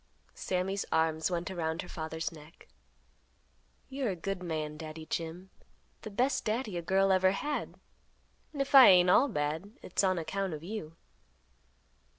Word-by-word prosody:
Sammy's 190 +2 -2
arms 160 0 +1
went 175 +1 -3
around 160 -3 -2
her - - -11
father's 160 0 -4
neck, 155 -1 -15 1.2
"You're 270 -3 -2
a 190 - -2
good 195 +2 -4
man, 155 -3 -3
Daddy 155 0 -8
Jim; 170 +4 -5 0.5
the 215 - -7
best 255 +5 0
Daddy 215 -2 -2
a 170 - -2
girl 195 +3 +2
ever 185 0 +4
had; 290 +8 -4 0.7
and 280 -2 -1
if 275 - -11
I 270 -2 +11
ain't 180 -1 +6
all 265 +9 +5
bad, 160 - -3
it's 185 - -1
on 185 -1 +2
account 190 +1 -2
of 150 - -10
you." 170 -5 -6
180 Hz, 155 wpm, -31 LUFS, 160-200 Hz, 1.2 s, I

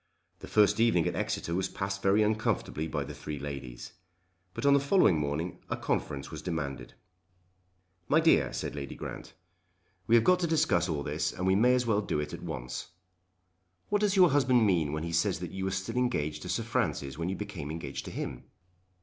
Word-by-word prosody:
The - - -9
first 105 0 +4
evening 115 -8 +3
at - - -2
Exeter 85 - -2
was 90 +1 0
passed 95 0 -4
very 100 +3 +4
uncomfortably 105 -7 -1
by 75 -3 -2
the 75 +2 -8
three 75 0 -6
ladies. 70 -4 -7 0.6
But - - -4
on 140 - +6
the 140 - +5
following 140 - +4
morning 75 +4 -3
a - - -1
conference 70 -1 -2
was - - -6
demanded. 75 -7 -4 1.1
"My - - +4
dear," - - +4
said - - -4
Lady 70 -1 -6
Grant, - - -8 0.7
"we 115 - +5
have 115 - +6
got 180 +5 +4
to 175 - 0
discuss 120 - +2
all 75 -3 -1
this - - -1
and 90 - -4
we 95 - +4
may 120 +6 +4
as 125 -1 +1
well 105 -3 +2
do 90 - -2
it 75 0 -4
at - - -7
once. 60 0 -5 1.0
What 205 0 +1
does 205 -2 +2
your 180 -3 +6
husband 130 -4 +4
mean 85 -7 +2
when 75 +1 -3
he 85 0 -4
says 95 +3 +2
that 85 -1 -6
you 95 0 -4
were - - 0
still 95 +5 -3
engaged 75 -12 0
to - - -7
Sir - - -1
Francis 70 +1 -2
when 85 +2 -1
you 95 - -2
became 95 -9 -6
engaged 75 -4 -5
to - - -6
him?" - - -5
95 Hz, 205 wpm, -30 LUFS, 75-115 Hz, 1.1 s, on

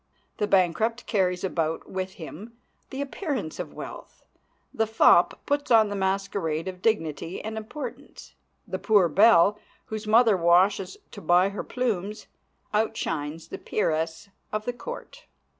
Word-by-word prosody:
The 210 - 0
bankrupt 205 +5 +2
carries 180 -4 0
about 165 -4 -2
with 190 0 -4
him 205 +8 -10 0.3
the 270 - -5
appearance 280 - -4
of - - -6
wealth. - - -9 0.5
The 220 0 +1
fop 220 +1 +4
puts 285 0 -1
on 220 -3 +6
the 205 - -3
masquerade 190 -4 -1
of 185 -1 -6
dignity 170 -5 -1
and 220 +1 -5
importance. 220 +7 -8 0.3
The 185 -1 -4
poor 205 -5 +4
belle, 205 +3 +5 0.3
whose 215 0 -6
mother 225 0 +5
washes 185 +2 +3
to - - -9
buy 175 +4 +4
her 200 - -5
plumes, 215 -4 -2 0.5
outshines 165 -8 -2
the - - -6
peeress 160 0 -1 0.2
of 215 0 -3
the 245 - -2
court. - - -9
200 Hz, 140 wpm, -26 LUFS, 175-220 Hz, 0.5 s, on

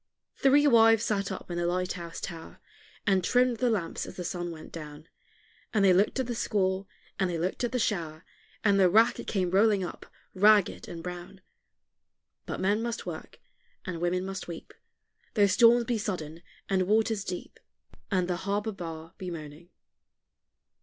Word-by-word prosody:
Three 285 +2 +4
wives 225 -4 +6
sat 200 -4 -1
up - - -7
in 175 - -2
the 175 - 0
light 180 +1 -1
house 170 -1 -7
tower, 165 -3 -8 0.5
And 190 -3 +2
trimmed 250 +3 +2
the 250 +1 +1
lamps 200 -7 -2
as - - -9
the 180 - -5
sun 175 0 -3
went 160 -2 -9
down; 150 -1 -9 0.7
And 200 -2 +4
they 185 - +6
looked 200 +8 +2
at 260 - 0
the 240 - -3
squall, 195 -3 0 0.3
and 190 -2 +1
they 170 - -2
looked 180 +8 -2
at 240 - 0
the 255 - 0
shower, 170 -8 -2 0.4
And 200 -2 +4
the 185 -2 +6
rack 225 +5 +4
it - - -7
came 185 -4 0
rolling 200 0 +4
up, 175 - -7 0.3
ragged 205 0 +4
and 165 -1 -8
brown; 180 +1 -8 1.1
But - - -4
men 205 +3 +1
must 235 0 -4
work, - - -8 0.5
and 175 -3 -5
women 180 +1 0
must 195 0 -5
weep, 170 -2 -9 0.6
Though 205 -2 +5
storms 235 +4 +5
be 235 -1 -1
sudden, 170 -6 -4 0.3
and 185 -1 +1
waters 215 0 +2
deep, 180 -2 -7 0.5
And 185 -3 +1
the 180 -1 -1
harbor 205 +3 -2
bar 165 -3 -8
be 185 - -5
moaning. 160 0 -9
190 Hz, 175 wpm, -28 LUFS, 175-215 Hz, 1.1 s, wives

